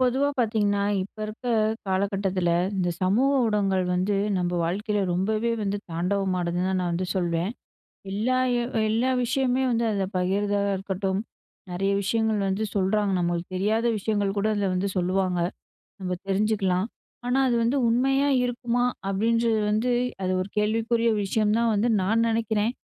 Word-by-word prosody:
பொதுவா 260 +3 +2
பார்த்தீங்கன்னா, 210 -4 +1 0.2
இப்ப 200 +3 -11
இருக்க 215 +4 -9 0.4
காலகட்டத்துல, 190 -2 0 0.3
இந்த 180 -2 0
சமூக 220 +9 +3
ஊடகங்கள் 200 -4 +1
வந்து 185 +3 +1 0.2
நம்ப 175 -1 -1
வாழ்க்கையில 205 +5 -1
ரொம்பவே 215 +6 0
வந்து 205 0 -1
தாண்டவமானதுன்னு 180 0 -1
தான் 190 0 0
நான் 175 -1 -1
வந்து 180 +2 -1
சொல்வேன். 175 +1 0 0.6
எல்லா 230 +6 0 0.2
எ - - 0 0.3
எல்லா 235 +4 +1
விஷயமுமே 255 +1 +1
வந்து 235 -1 +1
அதுல 200 -2 0
பகிருததா 200 +3 +1 0.2
இருக்கட்டும். 190 0 -2 0.5
நிறைய 195 +3 0
விஷயங்கள் 220 +1 +1
வந்து 195 +3 -1
சொல்றாங்க, 200 +1 +1
நம்மளுக்கு 175 +1 -2
தெரியாத 215 +5 +1
விஷயங்கள் 205 -1 -1
கூட 200 - +1
அதுல 200 -2 0
வந்து 185 +2 0
சொல்லுவாங்க. 185 0 0 0.6
நம்ம 180 -1 -2
தெரிஞ்சுக்கலாம். 195 -2 +1 0.4
ஆனா, 250 +2 +2
"அது 245 - +2
வந்து 240 +5 +1
உண்மையா 270 +4 +2
இருக்குமா?" 245 0 0 0.2
அப்படின்றது 225 +3 +1
வந்து, 220 +4 +1 0.3
அது 185 - 0
ஒரு 185 - -5
கேள்விக்குறிய 230 +2 +1
விஷயம்னு 210 +2 +1
தான் 235 -1 +2
வந்து 215 +4 +1
நான் 220 +5 +2
நினைக்கிறேன். 225 0 0
205 Hz, 140 wpm, -25 LUFS, 190-230 Hz, 0.6 s, சமூக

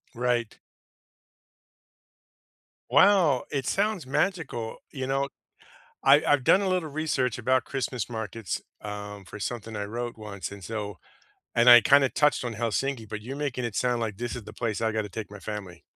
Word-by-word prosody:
Right. 120 -2 0 2.3
Wow, 180 -10 +5
it 135 -2 -2
sounds 200 -8 0
magical, 145 - -1 0.2
you 130 -2 -3
know, 135 +1 0 0.8
I 140 +2 +7
I've 145 -3 +3
done 195 - +5
a 195 - 0
little 180 -4 0
research 140 -6 -1
about 130 +1 +1
Christmas 125 -4 -3
markets, 110 -2 -4 0.2
um, 105 -1 -7
for 105 - -9
something 115 0 -4
I 105 0 -3
wrote 120 +2 -5
once, 100 -2 -6
and 100 -2 -10
so 105 -4 -5 0.6
and 120 +1 +5
I 120 -1 +11
kinda 140 0 +5
touched 150 -3 +2
on 120 -2 -4
Helsinki, 115 +1 -1
but 105 0 -5
you're 130 +5 -6
making 140 -4 -2
it 115 -4 -3
sound 120 -2 +1
like 105 -3 -3
this 120 0 -3
is 120 - -6
the - - -10
place 115 -2 -2
I 110 0 +1
gotta 110 -1 -1
take 110 +1 -6
my 105 - -9
family. 95 -5 -7
120 Hz, 170 wpm, -27 LUFS, 110-135 Hz, 2.3 s, I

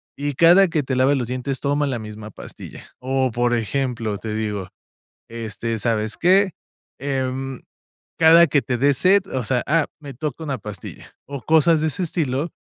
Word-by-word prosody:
Y 145 0 -3
cada 175 +7 +6
que 160 -3 -1
te 130 0 -2
laves 130 +2 +3
los 125 -3 -2
dientes 130 +2 -3
toma 145 +1 0
la 130 -3 -2
misma 105 -1 -8
pastilla. - - -11
O, 130 0 0
por 120 +1 +1
ejemplo, 115 -1 -2
te 110 -1 -5
digo: 105 -4 -3 0.6
"Este, 115 0 -4
¿sabes 110 -1 -1
qué? 190 +2 +3 0.5
Em, 135 -1 -3 0.6
cada 165 +1 +7
que 145 -1 +2
te 130 -2 -2
dé 140 +3 +3
sed, 185 +8 +4
o 130 -2 -1
sea, 125 +2 0
ah, 155 +1 +3
me 145 -3 -9
toca 150 +3 -5
una 140 -3 -2
pastilla". 105 -3 -9
O 140 -1 -6
cosas 160 +3 +3
de 160 - +1
ese 155 +5 -2
estilo, 155 -3 -1
135 Hz, 175 wpm, -21 LUFS, 115-150 Hz, 0.6 s, cada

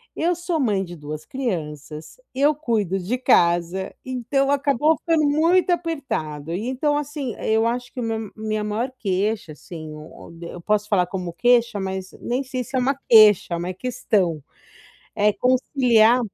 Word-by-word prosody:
eu 345 +2 +1
sou 345 -2 -2
mãe 205 -7 +1
de 175 -1 -8
2 150 0 -7
crianças, 155 - -5 0.2
eu 285 +3 +3
cuido 215 - -1
de 200 +8 -2
casa, 175 -3 +2
então 260 +2 -1
acabou 285 +2 +2
ficando 320 -3 +1
muito 335 +5 +3
apertado 270 - -2
e 210 +7 -3
então, 290 +3 0
assim, 290 -5 -4
eu 220 +1 +1
acho 245 +1 -3
que 255 - -6
o - - -2
meu 225 -2 -3
minha 215 -1 -3
maior 225 +5 -2
queixa, 200 -2 -1
assim, 155 +1 -9 0.5
eu 170 +1 -7
posso 210 +2 0
falar 185 -4 +3
como 180 -2 -5
queixa, 235 -2 +2
mas 190 -1 -4
nem 250 +3 -2
sei 255 -1 -4
se 265 - -8
é 260 - +3
uma 270 +2 +1
queixa, 215 -6 +6
é 170 - 0
uma 180 +2 -4
questão, 190 - -1 0.7
é 210 0 +3
conciliar 250 -2 +3
225 Hz, 160 wpm, -22 LUFS, 185-265 Hz, 0.7 s, queixa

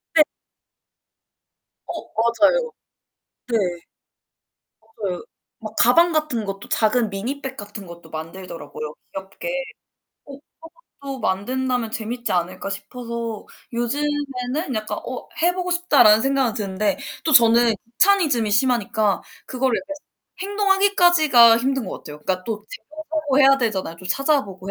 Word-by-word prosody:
네. 310 - +8 1.6
어. - - -4 0.2
맞아요. 305 - +2 0.8
네. 235 - +1 1.2
맞아요. 195 -11 -5 0.4
막 215 -1 -8
가방 335 +9 +5
같은 305 -8 0
것도 195 0 -6
작은 225 0 +2
미니 235 +9 -4
백 270 -1 -6
같은 205 -1 -8
것도 170 -1 -12
만들더라고요, 160 -2 -7 0.2
귀엽게. 195 - -7 1.3
그런 280 - -9
것도 260 - -8
만든다면 245 +4 -1
재밌지 235 +1 -4
않을까 185 +2 -2
싶어서 230 +2 -6 0.3
요즘에는 275 +2 -2
약간 215 -1 -3
'어, - - -6
해 350 +1 +4
보고 360 -1 -3
싶다.' 350 -5 +4
라는 215 +1 +7
생각은 270 -4 +1
드는데 200 -2 -1 0.3
또 315 - +1
저는 235 -2 +6 0.2
귀차니즘이 300 - +3
심하니까 220 -3 +1 0.2
그거를 255 -1 0
약간 295 +1 -7 0.5
행동하기까지가 355 - +5
힘든 265 -1 -1
것 - - -5
같아요. 150 -1 -10
그니까 185 +4 -2
또 215 -1 -4 0.3
찾아보고 310 -2 -2
해야 275 -1 +7
되잖아요. 195 -9 -2
좀 185 +2 -10
찾아보고 200 -8 0
235 Hz, 290 characters per minute, -22 LUFS, 205-290 Hz, 1.6 s, 네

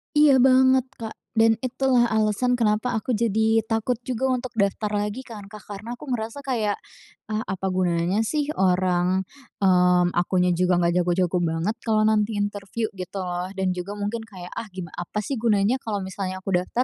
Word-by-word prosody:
Iya 285 -4 +6
banget, 260 0 +5 0.2
Kak, 225 -1 -6 0.2
dan 225 0 +5
itulah 255 -1 +2
alasan 220 +3 +1
kenapa 215 +2 +1
aku 245 +2 -1
jadi 220 0 +2
takut 225 +2 0
juga 255 +1 -1
untuk 255 -1 -1
daftar 200 +1 0
lagi 210 +4 -2
kan, 210 -5 -10
Kak, 210 0 -12
karena 215 +4 -6
aku 245 - -14
merasa 230 +3 -3
kayak, 225 -7 0 0.6
"Ah 215 - 0
apa 190 0 -2
gunanya 180 +1 +1
sih 295 +6 0
orang, 185 0 +2 0.4
mmm, 180 -1 +4
akunya 180 +1 +1
juga 180 +1 +2
nggak 170 +1 +2
jago-jago 180 0 +1
banget 165 +5 -1
kalau 215 -2 +1
nanti 215 0 +2
interview," 205 +2 -3
gitu 185 0 -6
loh. 180 0 -3
Dan 190 -1 0
juga 180 +3 -5
mungkin 205 +3 -3
kayak, 180 -5 -10
"Ah 230 - -5
gim 180 -4 -8
apa 175 +4 -4
sih 265 +2 -3
gunanya 220 +2 +2
kalau 210 -5 -3
misalnya 190 0 -5
aku 190 -2 +1
daftar, 235 +7 -1
205 Hz, 175 wpm, -24 LUFS, 185-230 Hz, 0.6 s, Iya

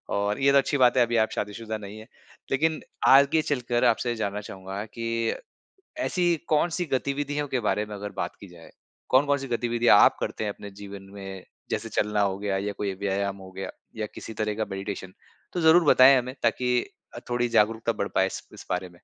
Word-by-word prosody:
और 100 +4 0
ये 140 0 +5
तो 140 - +5
अच्छी 140 +1 +2
बात 125 0 +4
है 125 - +6
अभी 120 0 -1
आप 110 0 +3
शादी-शुदा 110 +2 -4
नहीं 105 0 -9
है। 110 - -12 0.4
लेकिन 155 +4 +1 0.3
आगे 140 +4 +6
चलकर 125 -4 -1
आपसे 120 +1 +2
जानना 105 -1 -3
चाहूँगा 95 0 -7
कि 115 +1 -2 0.7
ऐसी 175 - +1
कौन-सी 170 +3 +1
गतिविधियों 145 +2 -1
के 130 -2 -1
बारे 105 0 0
में 105 - -8
अगर 100 0 -6
बात 85 0 -3
की 100 - -11
जाए, 85 -2 -15 0.4
कौन-कौन 140 +2 +3
सी 135 - -6
गतिविधियाँ 120 -2 +3
आप - - +5
करते - - -3
हैं 105 - -1
अपने 100 0 -10
जीवन 100 0 -10
में 95 -2 -8 0.3
जैसे - - -2
चलना 105 0 0
हो 100 -1 +1
गया 100 -1 -1
या 100 +1 -2
कोई 100 -1 -3
व्यायाम 100 0 -1
हो 95 -1 -12
गया 95 0 -5 0.3
या 110 -1 -2
किसी 110 - -8
तरह 105 -1 -1
का 110 0 -1
मेडिटेशन 95 -1 -5 0.4
तो 175 - -2
ज़रूर 165 +1 +6
बताएँ 135 -1 +7
हमें 125 +1 -4
ताकि 125 -1 +2 0.3
अ, - - -6
थोड़ी 120 0 +1
जागरूकता 115 +1 +2
बढ़ 100 -1 -3
पाए 95 - +3
इस - - -6
इस - - -12
बारे 90 0 -1
में। - - -20
110 Hz, 205 wpm, -26 LUFS, 100-130 Hz, 0.7 s, बताएँ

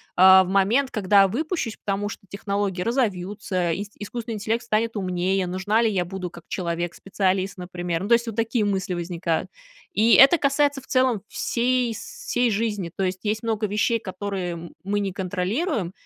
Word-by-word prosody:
а, 190 +1 +8
в - - -6
момент, 215 +8 +2
когда 200 -2 +4
выпущусь. 285 - -2
Потому 200 +1 -1
что - - -7
технологии 200 -2 -2
разовьются, 195 -6 -1
ис 205 +3 -4
искусственный 230 +2 -5
интеллект 225 +3 -1
станет 225 0 0
умнее, 185 0 0
нужна 200 +5 +1
ли 225 - +3
я 180 -3 0
буду 180 -1 -5
как 170 - -13
человек-специалист, 185 +2 -2
например? 175 -1 -4
Ну, - - -3
то - - +6
есть, 235 0 +3
вот 220 - -4
такие 230 -1 0
мысли 190 -2 -1
возникают. 170 -1 -2 0.4
И 225 -1 +4
это 275 +6 +8
касается 280 -1 +1
в - - -20
целом 255 -6 +2
всей 245 -1 0
сей 245 -1 -2
жизни. 205 -5 -1
То 195 - -1
есть 185 0 -1
есть 215 +1 -1
много 220 -1 0
вещей, 215 +3 +1
которые, 190 -2 -4
м, 170 0 -9
мы 205 +1 -1
не 195 -2 -1
контролируем, 195 - -2
200 Hz, 170 wpm, -24 LUFS, 185-230 Hz, 0.4 s, а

